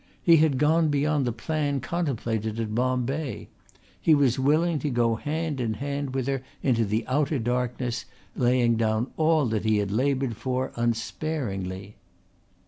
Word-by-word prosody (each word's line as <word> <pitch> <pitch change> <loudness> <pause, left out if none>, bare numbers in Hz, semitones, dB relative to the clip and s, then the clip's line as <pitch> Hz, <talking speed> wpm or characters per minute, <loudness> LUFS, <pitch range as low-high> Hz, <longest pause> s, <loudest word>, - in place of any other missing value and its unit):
He 170 -1 +7
had 150 -3 +3
gone 160 +3 +3
beyond 145 -2 +1
the - - +1
plan 145 +4 -1
contemplated 115 -8 -2
at 110 -2 -2
Bombay. 130 +4 -1 0.5
He 160 - +5
was 135 -4 +2
willing 155 +4 +2
to 145 - -2
go 120 -3 +2
hand 150 +3 -2
in 110 -2 -1
hand 140 +1 -3
with 130 -2 0
her 135 -1 -1 0.2
into 115 -4 +2
the 110 +3 -1
outer 145 +3 +1
darkness, 120 0 -2 0.3
laying 120 -2 +2
down 110 +2 0
all 155 -2 +3
that 110 -2 -1
he 110 -1 +2
had 100 -1 -1
laboured 130 +1 0
for 130 +2 -2
unsparingly. 110 -5 -3
130 Hz, 150 wpm, -26 LUFS, 115-145 Hz, 0.5 s, He